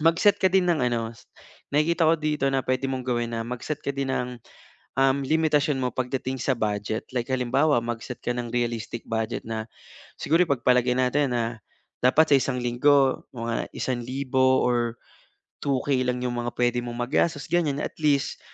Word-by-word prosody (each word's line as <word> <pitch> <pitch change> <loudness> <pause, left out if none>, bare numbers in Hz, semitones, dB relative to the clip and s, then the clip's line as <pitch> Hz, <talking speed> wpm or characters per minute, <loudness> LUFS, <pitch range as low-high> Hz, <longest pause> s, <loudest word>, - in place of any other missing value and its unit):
mag-set 170 +5 +4
ka 190 - +5
din 190 0 +3
ng. 165 -5 +2
Ano 115 -2 -1 0.6
nakikita 165 +2 +3
ko 165 - +5
dito 150 -2 0
na 135 -1 0
pwede 130 +1 0
mong 130 -1 -3
gawin 120 -1 -1
na 115 - -2
mag-set 125 +5 -4
ka - - 0
din 135 -1 -2
ng 125 -1 -3 0.9
limitasyon 155 -2 +2
mo 125 - 0
pagdating 130 +1 -2
sa 130 - +1
budget. 105 0 -2
Like 120 +1 -1
halimbawa, 130 +2 +2
mag-set 120 +1 -5
ka 120 - 0
ng 120 -1 -3
realistic 115 -1 -2
budget 110 0 -2
na 110 -1 -4 0.5
siguro 165 +3 +2
ipagpalagay 125 -3 +2
natin 130 +1 +1
na 115 -1 -2 0.4
dapat 150 +4 +4
sa - - +9
isang 125 -1 -1
linggo 135 +2 +3
mga 115 0 -2
₱1,000 130 +1 +1
or 120 -1 0 0.7
2K 135 -1 0
lang 125 0 -1
'yung 125 - -1
mga 120 0 -2
pwede 120 0 +2
mong 120 0 -6
magastos. 145 +1 0
Ganyan, 150 -5 +1
at - - -6
least 145 -3 +1
130 Hz, 165 wpm, -25 LUFS, 120-145 Hz, 0.9 s, sa